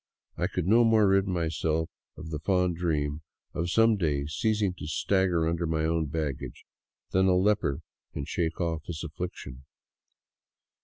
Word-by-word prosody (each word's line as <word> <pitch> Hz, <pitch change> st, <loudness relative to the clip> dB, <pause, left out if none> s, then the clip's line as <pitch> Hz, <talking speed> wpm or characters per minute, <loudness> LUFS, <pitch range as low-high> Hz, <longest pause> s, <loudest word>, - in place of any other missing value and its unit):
I -, -, 0 dB
could -, -, -3 dB
no 115 Hz, +5 st, +5 dB
more 110 Hz, -2 st, +5 dB
rid 95 Hz, 0 st, +3 dB
myself 80 Hz, -2 st, 0 dB, 0.3 s
of 80 Hz, +1 st, -8 dB
the 75 Hz, -, -3 dB
fond 90 Hz, +1 st, +1 dB
dream 75 Hz, -3 st, -1 dB, 0.3 s
of 85 Hz, +1 st, -2 dB
some 115 Hz, +3 st, +4 dB
day 75 Hz, -6 st, 0 dB
ceasing 105 Hz, +5 st, 0 dB
to -, -, -6 dB
stagger 90 Hz, -1 st, +1 dB
under 85 Hz, 0 st, -1 dB
my 80 Hz, 0 st, 0 dB
own 80 Hz, -1 st, 0 dB
baggage 75 Hz, -4 st, -4 dB, 0.5 s
than 95 Hz, +1 st, +3 dB
a 90 Hz, -, +4 dB
leper 95 Hz, -8 st, +1 dB, 0.3 s
can 70 Hz, -, -5 dB
shake 80 Hz, 0 st, -2 dB
off 80 Hz, -3 st, -1 dB
his 80 Hz, -2 st, -5 dB
affliction. 75 Hz, -5 st, -6 dB
85 Hz, 155 wpm, -28 LUFS, 80-95 Hz, 0.5 s, no